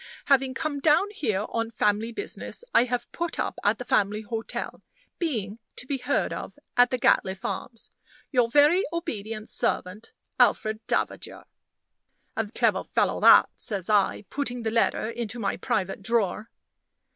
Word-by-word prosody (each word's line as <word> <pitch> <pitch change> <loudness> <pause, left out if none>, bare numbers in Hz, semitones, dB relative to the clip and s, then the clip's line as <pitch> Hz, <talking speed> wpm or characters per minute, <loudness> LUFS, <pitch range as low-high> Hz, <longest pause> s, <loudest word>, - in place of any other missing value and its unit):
Having 270 -2 +3
come 305 -2 -2
down 315 +8 +3
here 215 - -1
on 230 0 -2
family 215 0 0
business, 405 - -5
I 235 - +6
have 245 -1 -3
put 340 -1 -3
up - - -2
at - - +3
the - - -7
family 210 +1 +1
hotel 225 +1 -5 0.4
being 225 - -2 0.2
to - - -6
be 270 +1 -2
heard 250 +3 0
of - - -7 0.2
at 245 0 +6
the 255 - 0
Gatliffe 190 -5 +2
Arms. 230 -3 -5 0.4
Your 245 -4 +3
very 295 - +5
obedient 225 - -4
servant, 195 +5 -2 0.3
ALFRED 215 0 +3
DAVAGER." - - -2 0.9
"A 225 - -1
clever 210 - +1
fellow - - 0
that," - - +7
says 200 -2 -3
I, 205 0 +2
putting 250 -4 -3
the 220 - -1
letter 230 -1 +1
into 235 0 -4
my 205 -4 -1
private 190 +1 -2
drawer. 215 0 0
230 Hz, 150 wpm, -26 LUFS, 210-265 Hz, 0.9 s, that